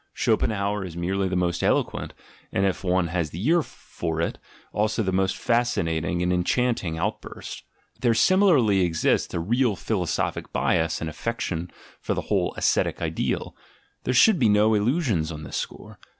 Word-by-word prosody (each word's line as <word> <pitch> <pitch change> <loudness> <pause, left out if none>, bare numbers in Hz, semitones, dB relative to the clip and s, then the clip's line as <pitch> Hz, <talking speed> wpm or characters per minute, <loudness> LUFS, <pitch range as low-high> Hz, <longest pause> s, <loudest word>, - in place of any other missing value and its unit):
Schopenhauer 100 -1 0
is 85 -3 -7
merely 95 +3 0
the 90 - -2
most 90 -1 0
eloquent, - - 0 0.4
and 95 - +1
if 95 0 -1
one 90 -2 +1
has 85 -3 -1
the 85 +8 -6
ear 170 +1 +4
for 80 - -5
it, 85 - -2 0.3
also 110 +2 0
the 95 - -1
most 95 0 +1
fascinating 85 -8 0
and 90 0 +1
enchanting 90 -2 0
outburst. - - -5 0.4
There 120 -2 +2
similarly 145 - +4
exists 85 -3 +1
a - - 0
real 115 +5 +1
philosophic 95 -4 -2
bias 80 -1 +1
and 80 - -2
affection 90 -1 -3 0.3
for - - -2
the - - -1
whole - - -1
ascetic - - +1
ideal; - - -2 0.5
there 125 - 0
should 200 - +6
be 115 - +4
no 105 +2 +4
illusions 105 - +1
on 75 -1 -7
this - - -5
score. - - -7
95 Hz, 160 wpm, -25 LUFS, 85-115 Hz, 0.5 s, should